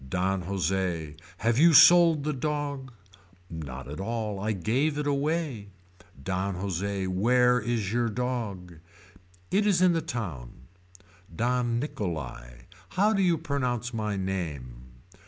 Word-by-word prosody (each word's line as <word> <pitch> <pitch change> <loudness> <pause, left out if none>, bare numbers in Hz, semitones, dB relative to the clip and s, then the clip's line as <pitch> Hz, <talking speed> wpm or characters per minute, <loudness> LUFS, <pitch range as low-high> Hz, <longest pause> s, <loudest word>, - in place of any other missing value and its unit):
Don 95 +2 0
Jose. 90 -4 -2 0.2
Have 115 +3 +1
you 165 +1 +6
sold 170 -2 +7
the 150 +1 -1
dog. 140 -1 -3 0.6
Not 70 -5 -7
at 75 +4 -7
all 110 -1 -3
I 105 +2 -1
gave 125 - 0
it 150 - -2
away. 145 -5 -1 0.6
Don 95 +2 -2
Jose. 95 +1 -2
Where 125 +7 +3
is 110 -3 -2
your 120 -1 +1
dog. 105 -8 -4 0.7
It 205 +2 +2
is 195 -4 +3
in 180 -1 +4
the 165 - 0
town. 85 - -6 0.7
Don 120 +2 0
Nicholai. 70 - -5 0.4
How 210 +3 +4
do 195 - +1
you 175 -3 +3
pronounce 125 -6 -2
my 105 -2 -2
name. 75 -11 -4
110 Hz, 130 wpm, -27 LUFS, 95-140 Hz, 0.7 s, sold